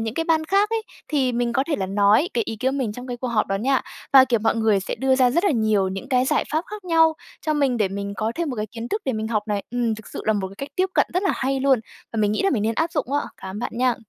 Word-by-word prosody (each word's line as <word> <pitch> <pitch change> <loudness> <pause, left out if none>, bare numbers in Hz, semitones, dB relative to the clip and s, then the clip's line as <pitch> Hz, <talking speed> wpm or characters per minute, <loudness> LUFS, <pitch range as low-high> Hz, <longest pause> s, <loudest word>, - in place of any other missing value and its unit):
những 225 0 -3
cái 330 - -1
ban 320 -1 +2
khác 400 +5 +2
ấy. 455 -1 0 0.3
Thì 270 -5 +1
mình 235 0 0
có 265 - +1
thể 315 - 0
là 190 - -2
nói 205 - +3
cái 235 - +1
ý 225 - -5
kiến 260 +4 0
của - - -2
mình 225 -6 -1
trong 250 +3 -8
cái 245 -1 -4
cuộc 250 +1 -4
họp 225 -2 +1
đó 195 - -1
nha, 260 +5 +1 0.3
và, 265 -1 +9
kiểu, 235 -4 +1
mọi 225 +1 +2
người 220 -3 +2
sẽ - - -4
đưa 265 +2 +2
ra 255 -2 +4
rất 340 +8 +1
là 400 - +4
nhiều 215 -7 +2
những 190 +1 -6
cái 255 -1 +3
giải - - +1
pháp 315 +3 0
khác 420 -2 -8
nhau 325 -2 +4 0.3
cho 305 - +2
mình 275 -4 +1
để 210 -4 +1
mình 200 +1 -4
có 220 +1 -1
thêm 335 -3 -2
một 250 - -5
cái 210 0 -2
kiến 230 +2 -7
thức 425 - -2
để 265 - 0
mình 220 0 -3
học 215 -2 0
này. 205 -1 -1
Ừm, 240 -2 0
thực 220 -1 -12
sự - - -7
là 220 - +3
một 195 -3 -2
cái 195 - -13
cách 275 - -5
tiếp 370 +1 +3
cận - - +4
rất 365 - +1
là 390 - +2
hay 270 0 -1
luôn, 265 -4 +3 0.3
và - - -5
mình 210 -1 +2
nghĩ 215 - 0
là 390 - +2
mình 225 -8 0
nên 225 +1 0
áp 325 +4 0
dụng 280 -3 -2
á. 290 - +2 0.2
Cảm 190 - -8
ơn - - -4
bạn - - -3
nha! 250 0 +2
245 Hz, 330 wpm, -23 LUFS, 215-290 Hz, 0.3 s, và